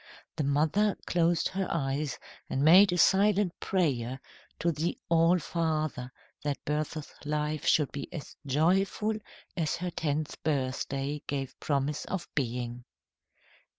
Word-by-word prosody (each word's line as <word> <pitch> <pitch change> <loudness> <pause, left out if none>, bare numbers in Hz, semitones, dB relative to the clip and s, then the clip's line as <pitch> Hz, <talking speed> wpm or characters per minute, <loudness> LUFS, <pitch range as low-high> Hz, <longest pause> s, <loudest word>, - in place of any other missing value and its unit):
The 150 - -1
mother 155 +9 +2
closed 170 -1 +2
her 190 0 -2
eyes 140 -3 -1 0.3
and 135 - 0
made 185 +4 +8
a 180 - 0
silent 195 0 +3
prayer 135 -9 0 0.4
to 170 - +1
the 160 +3 -2
All 165 +1 +5
Father 155 -7 -2 0.3
that 145 -1 -1
Bertha's 150 +1 -3
life 150 0 -2
should 150 -3 +3
be 140 - -6
as 155 - -7
joyful 185 +9 +2 0.4
as 165 -4 0
her 180 0 -3
tenth 155 -2 -2
birthday 140 0 -1
gave 135 -2 -3
promise 145 0 -1
of 185 -2 -4
being. 120 -2 -2
155 Hz, 125 wpm, -29 LUFS, 140-175 Hz, 0.4 s, made